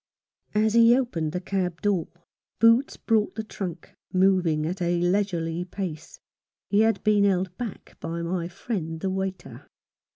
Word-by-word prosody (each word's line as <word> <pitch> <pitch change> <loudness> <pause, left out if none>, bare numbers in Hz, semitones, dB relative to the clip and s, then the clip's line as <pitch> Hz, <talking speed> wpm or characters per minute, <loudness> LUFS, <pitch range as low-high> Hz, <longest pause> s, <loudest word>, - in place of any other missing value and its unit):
As 215 0 +3
he 235 +1 +6
opened 170 -12 -1
the 180 - -2
cab 180 -2 -2
door, 195 -5 +1 0.5
Boots 230 +4 +4
brought 220 -2 +1
the 220 - -3
trunk, 180 -6 -7 0.2
moving 185 -5 +3
at 180 +3 -3
a 175 0 +1
leisurely 175 -2 0
pace. 180 -4 -6 0.5
He 205 - +4
had 225 +1 +2
been 210 -1 +4
held 185 -2 +1
back 235 -5 -7
by 170 +1 -4
my 170 0 -2
friend 175 -3 -4
the 190 +3 -2
waiter. 190 0 -5
185 Hz, 150 wpm, -26 LUFS, 170-210 Hz, 0.5 s, he